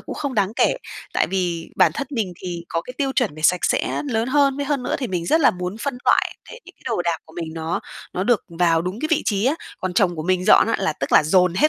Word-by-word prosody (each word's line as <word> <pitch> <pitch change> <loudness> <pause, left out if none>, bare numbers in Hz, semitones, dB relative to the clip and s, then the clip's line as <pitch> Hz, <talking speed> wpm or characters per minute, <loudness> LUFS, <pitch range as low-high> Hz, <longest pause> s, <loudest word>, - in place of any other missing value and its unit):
cũng - - -7
không 280 -3 -3
đáng 205 -1 +1
kể, - - +2 0.4
tại - - +2
vì 175 -3 -2
bản - - +5
thân 280 - -3
mình 220 -9 -2
thì 175 -2 -5
có 165 - -1
cái 250 - -9
tiêu 275 -2 0
chuẩn 245 - 0
về 155 - -10
sạch 180 +3 +3
sẽ - - 0
lớn 225 0 0
hơn. 280 0 +3
Với 285 - -2
hơn 280 -3 0
nữa - - -1
thì 265 - -2
mình 180 -5 -3
rất 320 - +3
là 280 - +6
muốn 180 +2 -5
phân 270 0 -3
loại - - +2
tại 485 - -10
vì - - -12
cái - - -28
đồ 225 -7 0
đạc 170 -1 0
của 160 - -18
mình 165 -2 -4
nó 160 +1 -2 0.3
nó 185 - -1
được 240 -1 +3 0.2
vào 165 -2 +3
đúng 185 +6 -4
cái 310 - -1
vị 320 -1 +2
trí 205 -1 0
á. 270 +4 +3 0.3
Còn 185 -1 -2
chồng 175 -2 +2
của 155 - -3
mình 185 +2 0
dọn 210 - +6
á, 230 - 0
là 195 -4 0
tức - - -5
là - - +7
dồn 180 +3 +3
hết 300 +11 +4
190 Hz, 290 wpm, -22 LUFS, 175-260 Hz, 0.4 s, là